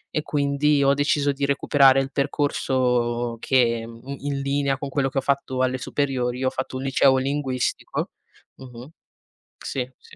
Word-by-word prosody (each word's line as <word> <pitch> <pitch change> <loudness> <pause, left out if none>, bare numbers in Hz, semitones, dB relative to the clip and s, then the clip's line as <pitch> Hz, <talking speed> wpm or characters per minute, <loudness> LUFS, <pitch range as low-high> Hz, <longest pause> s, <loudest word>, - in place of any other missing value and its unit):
e 155 - +1
quindi, 145 0 +1
ho 140 0 +4
deciso 145 0 +1
di 140 0 -5
recuperare 140 -1 +4
il 135 0 -2
percorso 125 -4 0
che 115 -3 +2
in 140 +4 -6
linea 140 0 0
con 140 0 -5
quello 135 -1 0
che 135 - -6
ho - - -3
fatto 135 -1 -1
alle 130 0 0
superiori, 130 -2 -2
ho 130 - +3
fatto 130 0 -4
un 130 - -5
liceo 135 0 +3
linguistico. 135 -1 -2 0.5
Mh, - - -12
mh, 125 +1 -11 0.7
sì, 130 -2 -4
sì. - - -18
135 Hz, 160 wpm, -23 LUFS, 130-140 Hz, 0.7 s, ho